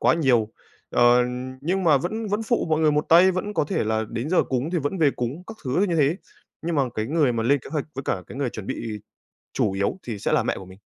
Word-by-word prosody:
quá - - +4
nhiều, 125 -9 +2 0.4
ờ, 120 0 +5 0.4
nhưng 180 +6 -1
mà 155 -4 +5
vẫn 215 +11 -3
vẫn 205 +2 -1
phụ 235 +1 0
mọi 155 0 +2
người 155 -1 +4
một 150 +1 +1
tay, 175 +3 +7
vẫn 190 +3 -3
có - - +2
thể 145 - -1
là 110 0 0
đến 120 +8 -4
giờ 185 - +4
cúng 130 +4 -2
thì 175 - +2
vẫn 145 +5 -2
về 155 -4 +4
cúng 130 +7 -4
các 225 - -9
thứ 140 +9 +1
như 170 - 0
thế. 150 +2 +3 0.5
Nhưng 170 0 -2
mà 140 - +4
cái 110 0 -2
người 150 -3 +2
mà 115 -1 -1
lên 140 +5 +3
kế - - -12
hoạch 150 -3 -2
với 135 - -4
cả 95 -9 -1
cái - - -10
người 135 -4 -1
chuẩn 105 -4 -8
bị 105 -2 -4 0.5
chủ 100 - +1
yếu 100 - -1
thì 115 -4 -5
sẽ - - -1
là - - +3
mẹ - - -1
của 95 - -9
mình. 95 +1 -14
145 Hz, 270 wpm, -24 LUFS, 120-170 Hz, 0.5 s, tay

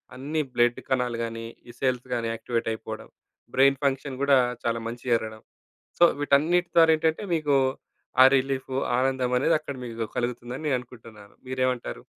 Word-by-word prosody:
అన్ని 145 +5 -2
బ్లడ్ 120 0 +2
కణాలు 125 -2 0
గానీ, 115 0 -6 0.2
ఈ - - -7
సెల్స్ 130 -1 0
గానీ 115 -1 -1
యాక్టివేటయిపోడం, 115 -1 -4 0.4
బ్రెయిన్ 135 +1 +4
ఫంక్షన్ 135 -1 -1
గూడా 140 -1 +5 0.3
చాలా 115 0 0
మంచిగ 120 +2 -7
జరగడం. 110 -1 -4 0.6
సో, 175 - +7 0.2
వీటన్నిటి 160 +5 +2
ద్వార 165 -1 +7
ఏంటంటే, 160 +4 0
మీకు 150 -3 +2 0.7
ఆ - - +10
రిలీఫు, 135 0 -2 0.2
ఆనందమనేది 130 +3 +2
అక్కడ 145 -2 -6
మీకు 115 -2 -7
గు 110 - -3
కలుగుతుందని 120 +3 -4
నే - - +1
అనుకుంటన్నాను. 115 -4 -13
మీరేవంటారు? 130 - -2
130 Hz, 145 wpm, -26 LUFS, 115-140 Hz, 0.7 s, ఆ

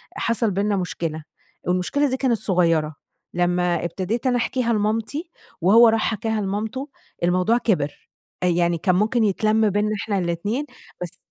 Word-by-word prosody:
حصل 230 -2 0
بينّا 200 +2 0
مشكلة، 165 -4 -3 0.4
والمشكلة 185 +11 +1
دي 260 - -1
كانت 255 -4 +1
صغيّرة، 165 -6 +1 0.4
لمّا 175 -1 +1
ابتديت 195 - -2
أنا 245 -1 +2
احكيها 245 0 0
لمامتي 225 - -1 0.3
وهو 225 +6 +7
راح 225 0 +1
حكاها 220 0 -2
لمامته، 215 +8 -3 0.3
الموضوع 180 +6 +3
كبِر، 170 -12 -1 0.3
يعني 175 -1 +2
كان 180 +3 +1
ممكن 220 +5 +2
يتلَم 215 +1 +2
بينّا 205 +2 0
إحنا 205 -2 -1
الاتنين، 195 - -2 0.4
بس 175 - -6
205 Hz, 140 wpm, -22 LUFS, 180-230 Hz, 0.4 s, وهو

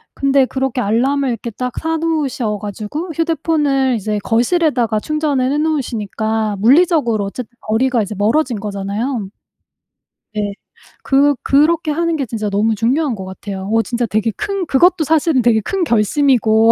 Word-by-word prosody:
근데 275 -1 +3
그렇게 265 -1 -2
알람을 260 +6 +1
이렇게 235 0 -4
딱 250 +3 -4
사 325 0 -1
놓으셔 285 -9 -1
가지고 215 - -5
휴대폰을 295 -5 +1
이제 215 -1 -2
거실에다가 240 -2 +1
충전을 290 -2 0
해 - - 0
놓으시니까 220 -8 -1
물리적으로 250 - +3
어쨌든 240 +4 -7
거리가 235 +2 +1
이제 210 +1 -6
멀어진 235 +3 +1
거잖아요. 205 +2 -3 1.0
네. 205 -1 -2 0.5
그 280 +1 +3
그렇게 305 +3 +2
하는 335 +2 0
게 280 -4 -2
진짜 215 -3 -3
너무 215 +3 +1
중요한 255 +5 0
것 190 -2 -7
같아요. 190 +1 -7
어 225 - +4
진짜 240 +1 -2
되게 220 +1 0
큰 395 -2 -2
그것도 345 +5 +3
사실은 315 -2 +2
되게 235 -2 +3
큰 380 - -2
결심이고 230 -3 +3
250 Hz, 350 characters per minute, -17 LUFS, 215-300 Hz, 1.0 s, 어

